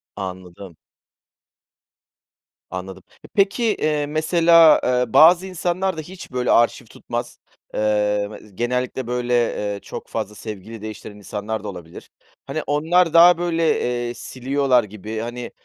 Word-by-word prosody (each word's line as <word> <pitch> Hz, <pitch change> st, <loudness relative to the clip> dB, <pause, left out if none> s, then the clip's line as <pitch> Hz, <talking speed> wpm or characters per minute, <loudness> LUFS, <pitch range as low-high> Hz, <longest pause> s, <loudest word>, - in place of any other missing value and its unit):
Anladım. 95 Hz, -2 st, -8 dB, 1.9 s
Anladım. 95 Hz, +1 st, -7 dB, 0.2 s
Eee, -, -, -14 dB
peki, 200 Hz, +3 st, +1 dB
eee, 155 Hz, -9 st, 0 dB
mesela, 165 Hz, +2 st, +5 dB
eee, 125 Hz, -2 st, 0 dB
bazı 175 Hz, +3 st, +7 dB
insanlar 185 Hz, 0 st, -2 dB
da -, -, -3 dB
hiç, 175 Hz, -1 st, -11 dB
böyle, 125 Hz, 0 st, 0 dB
arşiv 120 Hz, +1 st, +3 dB
tutmaz. 120 Hz, +2 st, -6 dB, 0.4 s
Eee, 105 Hz, -1 st, +1 dB
me -, -, -9 dB, 0.2 s
genellikle, 125 Hz, +2 st, -2 dB
böyle, 125 Hz, 0 st, -2 dB, 0.4 s
eee, 100 Hz, -, -6 dB
çok -, -, -8 dB
fazla 105 Hz, -, -5 dB
sevgili 110 Hz, +1 st, -8 dB
değiştiren 110 Hz, -1 st, -8 dB
insanlar 105 Hz, +1 st, -5 dB
da -, -, -6 dB
olabilir. 85 Hz, -4 st, -11 dB, 0.4 s
Hani, -, -, -4 dB
onlar 165 Hz, +3 st, +2 dB
daha, 170 Hz, +1 st, +7 dB
böyle, 165 Hz, -2 st, +1 dB, 0.3 s
eee, 120 Hz, -, -4 dB
siliyorlar 130 Hz, 0 st, 0 dB
gibi, 105 Hz, +1 st, -7 dB
hani, 120 Hz, +1 st, -6 dB
125 Hz, 130 wpm, -21 LUFS, 105-165 Hz, 1.9 s, bazı